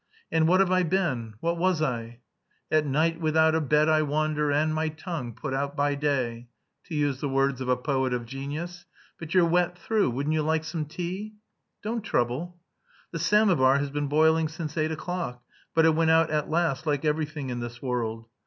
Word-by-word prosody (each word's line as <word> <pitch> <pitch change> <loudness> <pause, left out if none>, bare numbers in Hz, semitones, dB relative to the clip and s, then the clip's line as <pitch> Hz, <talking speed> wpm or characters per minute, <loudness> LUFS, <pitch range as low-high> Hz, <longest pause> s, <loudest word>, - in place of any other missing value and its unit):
And 160 -1 +3
what 185 +3 +5
have 190 -1 +2
I 185 0 +4
been; 150 - -1
what 170 0 -1
was 185 -2 +2
I? 120 -5 -3 0.5
'At 155 -1 +3
night 160 +4 +1
without 160 0 +3
a 160 - +2
bed 150 +1 +3
I 155 0 +4
wander 150 0 0
And 155 +2 +2
my 155 0 0
tongue 155 - -6
put 140 -3 -5
out 140 +1 -2
by 145 0 +1
day...' 130 -5 -1 0.4
to 165 - -6
use 145 -3 0
the 145 - -1
words 135 -1 +1
of 130 - -3
a 125 - +3
poet 130 -1 0
of 120 -1 -2
genius. 145 +8 -6 0.3
But 165 +2 -6
you're 180 -2 +6
wet 175 +1 +1
through.... 210 -1 +1
Wouldn't 140 +5 -1
you 155 - +1
like 160 +1 0
some 160 -1 -3
tea?" 185 +7 -5 0.5
"Don't 225 +2 -2
trouble." 175 - -2 0.5
"The 165 - -4
samovar 165 -8 +4
has 140 0 -2
been 145 0 -2
boiling 160 +2 +3
since 155 -1 -6
eight 155 -1 +1
o'clock, 160 -6 -4 0.3
but 160 0 +5
it 160 - +5
went 160 0 +2
out 160 0 +4
at 150 -1 -1
last 160 -2 0
like 145 0 0
everything 150 -3 -1
in 120 - -3
this 120 0 -6
world. 115 -3 -3
155 Hz, 200 wpm, -27 LUFS, 135-165 Hz, 0.5 s, you're